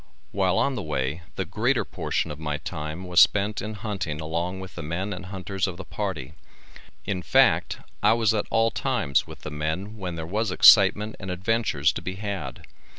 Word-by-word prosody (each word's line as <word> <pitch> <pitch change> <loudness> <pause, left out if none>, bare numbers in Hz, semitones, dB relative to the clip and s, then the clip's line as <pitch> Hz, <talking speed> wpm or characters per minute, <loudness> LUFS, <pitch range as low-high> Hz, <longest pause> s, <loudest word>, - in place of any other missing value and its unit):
While 95 -1 +1
on 140 - +2
the 125 - -3
way 75 +1 -2
the 95 - -2
greater 120 +9 0
portion 80 - -2
of 75 - -8
my 75 -1 -2
time 75 +4 -6
was 90 -1 +3
spent 105 +1 +4
in 110 +1 -5
hunting 95 -7 -4
along 85 +4 -3
with 95 -1 -9
the 85 - -7
men 85 +7 -3
and 95 - -7
hunters 95 0 -3
of 90 -2 -6
the 95 - -8
party, 80 -10 -4 0.7
in 100 -2 -2
fact - - +3 0.2
I 105 +2 +5
was 115 -2 +2
at 105 - -1
all 115 0 +2
times 70 -7 0
with - - -11
the 75 - -7
men 80 +8 -3
when 90 -3 -4
there 80 -1 -5
was 105 +5 -1
excitement 105 +2 +6
and 95 - -7
adventures 95 -5 +1
to - - -5
be 95 - -5
had. 95 -10 -5
95 Hz, 195 wpm, -25 LUFS, 80-105 Hz, 0.7 s, excitement